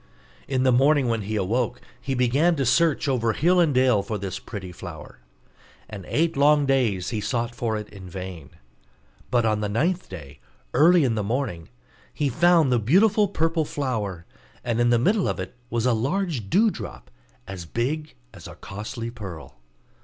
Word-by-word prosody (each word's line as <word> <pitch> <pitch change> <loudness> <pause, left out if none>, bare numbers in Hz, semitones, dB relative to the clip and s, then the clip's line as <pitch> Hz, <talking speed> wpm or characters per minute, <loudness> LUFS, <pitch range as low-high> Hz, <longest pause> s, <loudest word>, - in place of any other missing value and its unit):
In 130 -2 0
the 130 - +4
morning 135 +1 +3
when 115 -1 0
he 105 +2 -4
awoke, 110 +4 -1 0.2
he 135 -1 -2
began 135 +8 +2
to 135 -3 -1
search 155 +4 +2
over 115 -4 +1
hill 180 +7 +3
and 165 -4 +4
dale 130 -5 +3
for 110 +1 -4
this 95 -2 -5
pretty 95 -5 -8
flower; 90 - -10 0.7
and 100 -4 -9
eight 165 +2 0
long 145 +1 +4
days 120 -9 +1
he 110 -3 -2
sought 120 0 -2
for 115 -2 -2
it 105 -1 -6
in 95 -3 -11
vain: 90 -4 -8 0.8
but 120 -2 +2
on 110 -1 +1
the 105 - -2
ninth 170 - -1
day, 75 -7 -10 0.3
early 170 +2 +5
in 125 -4 +1
the 110 - -1
morning, 105 -7 -3 0.4
he 145 -2 -1
found 165 +1 +4
the 120 - +3
beautiful 200 - +4
purple 165 -3 0
flower; 110 - -3 0.4
and 120 -1 0
in 120 - +3
the 120 - +4
middle 195 - +2
of - - -2
it 95 0 -5 0.2
was 120 0 -1
a 125 - +3
large 135 - -2
dewdrop, 200 - 0 0.4
as 90 -4 -7
big 150 - -3 0.2
as - - -11
a - - -10
costly 110 +3 -6
pearl. 95 - -9
120 Hz, 175 wpm, -24 LUFS, 105-150 Hz, 0.8 s, early